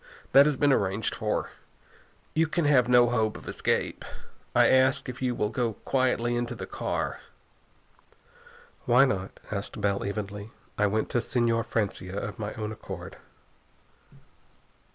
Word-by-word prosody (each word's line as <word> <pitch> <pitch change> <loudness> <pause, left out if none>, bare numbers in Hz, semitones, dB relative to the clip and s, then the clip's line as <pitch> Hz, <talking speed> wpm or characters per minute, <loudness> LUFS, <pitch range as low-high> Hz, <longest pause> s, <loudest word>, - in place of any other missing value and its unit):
That 140 +2 +8
has 150 -3 0
been 145 0 +4
arranged 100 -1 0
for. - - -2 0.8
You 160 +1 +2
can 160 +1 0
have 130 -4 +4
no 120 -1 +6
hope 110 -3 0
of - - -13
escape. - - -1 0.5
I - - +6
ask 130 +1 +3
you - - -2
if 125 - -13
you 125 -2 0
will 105 - 0
go 120 -2 -1
quietly 125 -2 +1
into 120 0 -2
the - - -6
car?" - - -3 1.7
"Why 125 +1 +6
not?" 95 -7 -3
asked 100 +2 -4
Bell 100 -1 0
evenly. 100 +1 -5 0.3
"I 105 - +2
went 110 +2 -1
to 120 - +2
Señor 115 -1 0
Francia 100 -3 -2
of 105 +1 -5
my 105 -1 -3
own 110 0 -4
accord." 110 - -8
120 Hz, 150 wpm, -27 LUFS, 105-130 Hz, 1.7 s, That